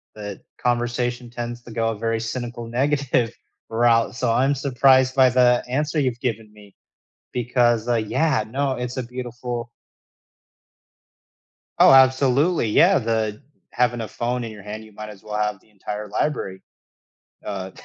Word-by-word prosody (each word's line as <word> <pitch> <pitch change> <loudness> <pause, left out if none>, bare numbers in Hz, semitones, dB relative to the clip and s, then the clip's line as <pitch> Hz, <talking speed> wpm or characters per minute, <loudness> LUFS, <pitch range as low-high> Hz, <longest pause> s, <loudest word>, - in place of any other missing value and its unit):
the 105 -2 -7 0.2
conversation 120 0 -1
tends 120 0 -6
to 120 - -12
go 115 0 0
a 110 - -3
very 115 0 -1
cynical, 120 0 -5
negative 130 -1 0 0.4
route, 115 0 +2
so 115 0 0
I'm 135 +4 +2
surprised 130 -1 +3
by 130 -1 +6
the 125 -1 +4
answer 150 +5 -1
you've 130 -4 0
given 110 -4 -3
me, 105 -2 -17 0.6
because, 120 -1 +1
uh, 120 - +3
yeah, 110 +3 +1
no, 135 +3 -1
it's 125 0 -4
a 130 - -1
beautiful 120 -1 -6 2.1
Oh, - - +8
absolutely, 135 +2 +4
yeah, 175 - +5
the 110 -1 -2 0.3
having 120 -1 +1
a 110 - -4
phone 120 +1 -2
in 115 - -6
your 105 -2 -12
hand, 105 +2 -7
you 110 - -16
might 105 +1 -8
as 100 -2 -13
well 105 0 -5
have 105 -2 -1
the - - -28
entire 105 +1 -6
library, 105 -4 -2 0.8
uh, 95 -1 -5
120 Hz, 150 wpm, -22 LUFS, 110-130 Hz, 2.1 s, Oh